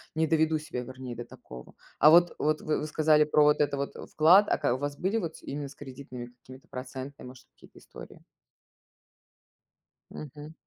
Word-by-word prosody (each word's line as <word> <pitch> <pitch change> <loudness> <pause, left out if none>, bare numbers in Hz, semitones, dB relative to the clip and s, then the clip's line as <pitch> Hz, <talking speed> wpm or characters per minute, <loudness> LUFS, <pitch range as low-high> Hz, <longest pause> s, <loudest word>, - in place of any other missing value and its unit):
не 160 - +2
доведу 160 0 +2
себя 150 -5 -6
вернее 130 -1 -8
до 120 - -7
такого. 60 0 -13 0.2
А 150 - +7
вот 175 +1 +6
вот 155 0 0
вы 155 - -1
вы - - -4
сказали 155 0 +3
про 150 0 +3
вот 150 0 +4
это 145 -1 +1
вот 140 0 -3 0.2
вклад. 180 +7 +6
А - - +2
ка 145 -4 0
у - - -4
вас 145 +1 -4
были 190 +7 -1
вот 165 -7 -4
с - - -19
именно 145 +1 -5
с 140 - -13
кредитными 130 -3 -9
какими-то 130 +2 -16
процентными, 130 +1 -8
может, 130 0 -14
какие-то - - -18
истории? - - -13 1.9
Мгм. 150 +2 -10
145 Hz, 185 wpm, -28 LUFS, 130-155 Hz, 1.9 s, А